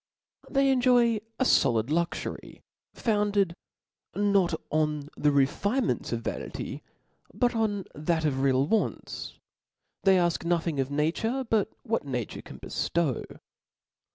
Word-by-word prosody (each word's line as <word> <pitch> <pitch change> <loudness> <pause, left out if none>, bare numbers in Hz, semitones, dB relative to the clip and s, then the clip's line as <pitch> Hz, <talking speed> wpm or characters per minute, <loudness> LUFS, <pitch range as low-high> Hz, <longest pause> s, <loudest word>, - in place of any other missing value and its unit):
They 275 -1 +3
enjoy 245 -3 +4 0.2
a - - +4
folid 115 - +3
luxury, 170 +2 -3 0.3
founded 205 -4 +1 0.6
not 200 -4 +2 0.2
on 150 -1 0
the 150 - +2
refinements 200 - +1
of - - -1
vanity, - - -5 0.5
but 245 -1 +2
on 205 -3 0
that 160 +2 0
of 135 -3 0
real 135 0 +3
wants; 220 +8 -2 0.6
they 195 -1 +5
afk 175 -2 +1
nothing 170 -3 0
of 135 0 0
nature 175 - 0
but 220 -2 +2
what 230 -2 -1
nature 125 -6 -4
can - - -11
beftow. 160 -7 -2
175 Hz, 120 wpm, -28 LUFS, 150-225 Hz, 0.6 s, they